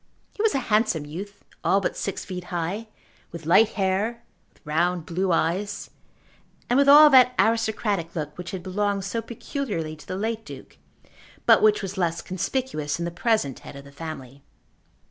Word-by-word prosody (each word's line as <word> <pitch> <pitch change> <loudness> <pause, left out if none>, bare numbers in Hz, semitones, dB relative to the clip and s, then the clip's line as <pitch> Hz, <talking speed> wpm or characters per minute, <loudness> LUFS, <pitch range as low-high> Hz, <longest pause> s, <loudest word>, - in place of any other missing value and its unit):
He - - -4
was 445 -6 +2
a - - +2
handsome 210 -8 +2
youth, 195 +7 -9 0.2
all 195 - +3
but 195 - -2
six 195 - -4
feet 180 -2 -6
high, 180 +5 -3 0.4
with 165 -2 -9
light 200 +7 +5
hair, 205 +4 -1 0.3
with - - -29
round 170 +2 0
blue 185 +2 -1
eyes, 185 +5 -1 0.8
and 245 - +2
with 280 0 +5
all 295 +1 +9
that 255 -1 +6
aristocratic 220 -6 0
look, 150 -2 -4
which 180 0 -7
had 185 -2 -6
belonged 200 +1 -1
so 230 +3 -2
peculiarly 225 - -4
to 150 - -16
the 185 - -4
late 220 +2 -2
Duke 135 - -12 0.7
but - - +6
which 210 -1 +4
was 195 0 -5
less 170 -2 -1
conspicuous 185 - -2
in 170 - -3
the 170 - -3
present 175 - 0
head - - -11
of 140 0 -10
the 140 - -13
family. 140 -3 -8
190 Hz, 175 wpm, -24 LUFS, 165-220 Hz, 0.8 s, all